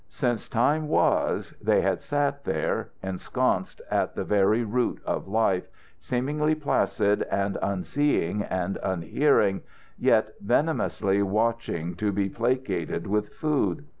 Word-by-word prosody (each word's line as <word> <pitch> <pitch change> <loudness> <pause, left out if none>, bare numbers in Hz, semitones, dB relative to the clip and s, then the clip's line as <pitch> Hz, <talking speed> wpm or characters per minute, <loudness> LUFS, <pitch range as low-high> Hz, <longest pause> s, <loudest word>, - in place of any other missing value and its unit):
Since 120 -5 -2
time 145 +6 +2
was - - +1
they - - +3
had - - 0
sat 145 -1 -1
there, 80 - -1
ensconced 95 -1 -1
at - - 0
the - - -2
very 105 +3 +3
root 120 +3 0
of - - -2
life, 100 -3 +1 0.3
seemingly 150 +5 0
placid 105 -8 +1
and 100 0 -1
unseeing 100 - 0
and 95 -1 -2
unhearing, 95 - +2 0.4
yet - - +3
venomously 100 0 +1
watching 105 -4 -1
to 105 +1 0
be 100 0 0
placated 115 -9 -1
with 105 +1 0
food. 150 -1 -1
105 Hz, 120 wpm, -26 LUFS, 95-135 Hz, 0.4 s, they